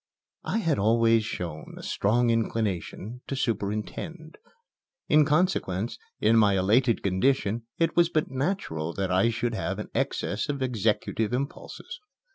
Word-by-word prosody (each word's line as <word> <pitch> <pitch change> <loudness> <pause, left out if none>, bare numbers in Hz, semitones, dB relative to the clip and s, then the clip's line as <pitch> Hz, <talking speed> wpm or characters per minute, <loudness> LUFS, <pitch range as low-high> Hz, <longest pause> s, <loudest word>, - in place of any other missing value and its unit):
I - - 0
had 165 - +1
always 115 +1 +4
shown 85 -7 -6
a - - -9
strong 120 +4 +2
inclination 115 0 -2
to 140 - -3
superintend. 125 - -3 0.7
In 150 0 +6
consequence, 140 - 0 0.2
in 115 +2 +4
my 100 -3 +4
elated 115 +6 +3
condition 110 +3 +1
it 165 - +1
was 170 -1 +4
but 155 -5 0
natural 130 - -2
that 95 -1 -1
I 95 +5 +3
should 120 +1 -1
have - - -2
an - - -6
excess 105 +6 -1
of 140 -2 -1
executive 115 -1 0
impulses. 140 +3 -5
115 Hz, 135 wpm, -27 LUFS, 100-135 Hz, 0.7 s, In